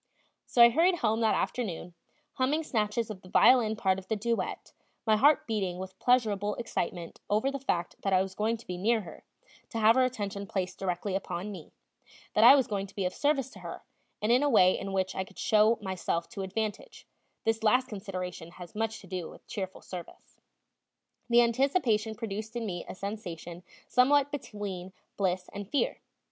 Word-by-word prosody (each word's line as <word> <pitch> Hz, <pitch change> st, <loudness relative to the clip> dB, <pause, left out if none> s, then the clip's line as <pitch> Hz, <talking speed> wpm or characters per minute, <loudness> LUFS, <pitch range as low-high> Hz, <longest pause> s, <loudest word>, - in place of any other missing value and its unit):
So 240 Hz, -, +6 dB
I 235 Hz, -, +9 dB
hurried 345 Hz, +7 st, +4 dB
home 225 Hz, -7 st, 0 dB
that 220 Hz, -, +3 dB
afternoon, 180 Hz, -7 st, -3 dB, 0.4 s
humming 285 Hz, +4 st, +1 dB
snatches 220 Hz, -4 st, -1 dB
of 190 Hz, -3 st, -9 dB
the 185 Hz, -, -14 dB
violin 225 Hz, +1 st, +5 dB
part 190 Hz, -3 st, +1 dB
of 190 Hz, -, -14 dB
the 220 Hz, -, 0 dB
duet, 230 Hz, +2 st, -3 dB, 0.3 s
my 220 Hz, -2 st, +4 dB
heart 285 Hz, +7 st, +4 dB
beating 195 Hz, -6 st, -2 dB
with 190 Hz, +1 st, -8 dB
pleasurable 210 Hz, -5 st, +2 dB
excitement 175 Hz, -7 st, -4 dB
over 215 Hz, +7 st, +2 dB
the 275 Hz, -, -4 dB
fact 175 Hz, -10 st, -2 dB
that 195 Hz, -, -1 dB
I 185 Hz, 0 st, +4 dB
was 190 Hz, -1 st, -7 dB
going 220 Hz, +3 st, 0 dB
to 230 Hz, -, -16 dB
be 180 Hz, -1 st, -5 dB
near 225 Hz, +3 st, +2 dB
her, 175 Hz, -, -11 dB, 0.5 s
to 230 Hz, -, -5 dB
have 225 Hz, +1 st, +5 dB
her 260 Hz, -, +5 dB
attention 200 Hz, -5 st, -3 dB
placed 185 Hz, -2 st, -3 dB
directly 185 Hz, +1 st, -2 dB
upon 195 Hz, +1 st, -4 dB
me; 180 Hz, -6 st, -10 dB, 0.6 s
that -, -, +4 dB
I -, -, +10 dB
was 270 Hz, -3 st, +3 dB
going 200 Hz, -2 st, -3 dB
to -, -, -18 dB
be 195 Hz, -, -1 dB
of 180 Hz, -, -1 dB
service 280 Hz, -3 st, 0 dB
to -, -, -12 dB
her, -, -, -8 dB, 0.4 s
and 215 Hz, -, +2 dB
in 250 Hz, +2 st, +5 dB
a 290 Hz, -, +2 dB
way 185 Hz, -7 st, +5 dB
in 195 Hz, -, -5 dB
which 190 Hz, -1 st, 0 dB
I 190 Hz, -, -2 dB
could -, -, -17 dB
show 215 Hz, +2 st, +4 dB
myself 180 Hz, -3 st, -2 dB
to 210 Hz, -4 st, -6 dB
advantage 205 Hz, +2 st, -4 dB, 0.4 s
this 225 Hz, 0 st, 0 dB
last 250 Hz, +4 st, +3 dB
consideration 185 Hz, -5 st, -6 dB
has 175 Hz, -2 st, -11 dB
much 220 Hz, 0 st, -2 dB
to 195 Hz, -, -14 dB
do 180 Hz, -3 st, -4 dB
with -, -, -15 dB
cheerful 190 Hz, -2 st, -6 dB
service. 180 Hz, -2 st, -10 dB, 0.9 s
The 240 Hz, 0 st, +6 dB
anticipation 235 Hz, -3 st, +1 dB
produced 220 Hz, 0 st, -5 dB
in 235 Hz, -1 st, -2 dB
me 175 Hz, -4 st, -4 dB
a -, -, -6 dB
sensation 180 Hz, -4 st, -6 dB, 0.3 s
somewhat 280 Hz, +3 st, +4 dB
between 200 Hz, -9 st, -6 dB, 0.2 s
bliss 185 Hz, -2 st, -1 dB
and 205 Hz, -1 st, -6 dB
fear. 285 Hz, -, 0 dB
210 Hz, 190 wpm, -29 LUFS, 190-235 Hz, 0.9 s, I